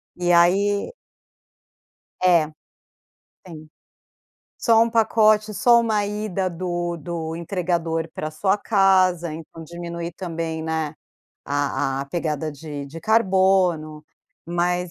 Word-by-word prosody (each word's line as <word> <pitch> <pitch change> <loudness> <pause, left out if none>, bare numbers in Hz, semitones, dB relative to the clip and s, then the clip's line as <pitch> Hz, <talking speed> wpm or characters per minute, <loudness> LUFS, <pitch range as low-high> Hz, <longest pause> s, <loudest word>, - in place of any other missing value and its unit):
E 175 0 0
aí 195 - +3 1.3
É. 170 -4 +4 0.9
Tem. 155 -4 -11 0.9
Só 225 -2 +4
1 230 - +2
pacote, 215 -1 +3
só 235 +5 +5
1 215 -3 0
ida 205 -3 -2
do 175 0 -3
do 165 0 -5
entregador 170 -2 -2
para 155 - -4
sua 190 +6 +1
casa, 185 -5 +2
então 165 +1 -10
diminui 170 +1 -6
também, 165 -2 -5
né, 160 -1 -2 0.5
a 140 -1 -1
a - - -7
pegada 155 -1 -3
de 145 -1 -7
de 160 +4 -9
carbono, 185 -7 +2 0.4
mas 175 +1 -1
175 Hz, 110 wpm, -22 LUFS, 160-190 Hz, 1.3 s, só